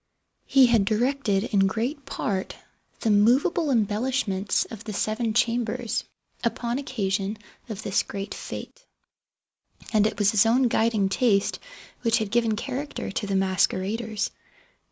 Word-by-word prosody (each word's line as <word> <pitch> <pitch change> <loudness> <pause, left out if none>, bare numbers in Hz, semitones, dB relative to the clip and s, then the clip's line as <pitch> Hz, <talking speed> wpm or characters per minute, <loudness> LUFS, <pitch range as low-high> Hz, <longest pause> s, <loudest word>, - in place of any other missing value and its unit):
He 270 -1 +6
had 235 -4 +4
directed, 220 -1 +1
in 195 -1 +4
great 245 +8 -3
part, 190 -2 -3 0.5
the 220 - +2
movable 260 - +3
embellishments 215 -3 0
of 225 -1 -10
the 215 - -6
seven 215 +2 -1
chambers, 235 -1 0 0.4
upon 235 +1 -1
occasion 205 -6 -2 0.3
of 215 -1 -6
this 200 - +1
great 195 0 -6
fĂŞte; - - -7 1.1
and 215 -1 +4
it 210 - -4
was 205 -1 +3
his 215 +1 +4
own 245 +2 +3
guiding 220 -3 +2
taste 200 0 +1 0.4
which 230 -2 +2
had 215 -4 -2
given 230 -2 +2
character 275 +3 -4
to 205 +1 -3
the 195 - -1
masqueraders. 195 +3 0
220 Hz, 135 wpm, -25 LUFS, 200-240 Hz, 1.1 s, He